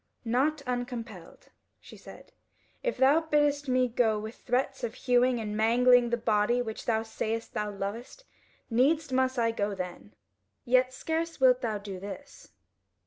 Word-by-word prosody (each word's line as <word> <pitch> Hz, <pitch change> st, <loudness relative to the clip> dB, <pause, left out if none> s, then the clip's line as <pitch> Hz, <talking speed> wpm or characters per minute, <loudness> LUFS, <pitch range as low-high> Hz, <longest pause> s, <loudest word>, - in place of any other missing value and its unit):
"Not 280 Hz, +6 st, +1 dB
uncompelled," 240 Hz, -7 st, -6 dB, 0.3 s
she -, -, -14 dB
said: -, -, -14 dB, 0.5 s
"if -, -, -2 dB
thou 275 Hz, +4 st, +5 dB
biddest 295 Hz, -2 st, +1 dB
me 255 Hz, 0 st, +3 dB
go 230 Hz, -2 st, +1 dB
with 215 Hz, +2 st, -6 dB
threats 265 Hz, +2 st, -2 dB
of 235 Hz, 0 st, -3 dB
hewing 250 Hz, -1 st, +2 dB
and 210 Hz, -1 st, -4 dB
mangling 240 Hz, +2 st, +4 dB
the 235 Hz, -, 0 dB
body 220 Hz, +1 st, +1 dB
which 220 Hz, -3 st, -5 dB
thou 220 Hz, -1 st, +1 dB
sayest 225 Hz, 0 st, -4 dB
thou 210 Hz, 0 st, -2 dB
lovest, 205 Hz, -, -6 dB, 0.4 s
needs 280 Hz, +5 st, +2 dB
must 260 Hz, 0 st, +1 dB
I 230 Hz, -1 st, +2 dB
go 205 Hz, -2 st, -2 dB
then. 175 Hz, -, -7 dB, 0.5 s
Yet 255 Hz, +1 st, +3 dB
scarce 325 Hz, +5 st, -3 dB
wilt 255 Hz, -1 st, +5 dB
thou 220 Hz, -4 st, -1 dB
do 200 Hz, -2 st, -7 dB
this." 205 Hz, +9 st, -10 dB
245 Hz, 150 wpm, -28 LUFS, 220-260 Hz, 0.5 s, thou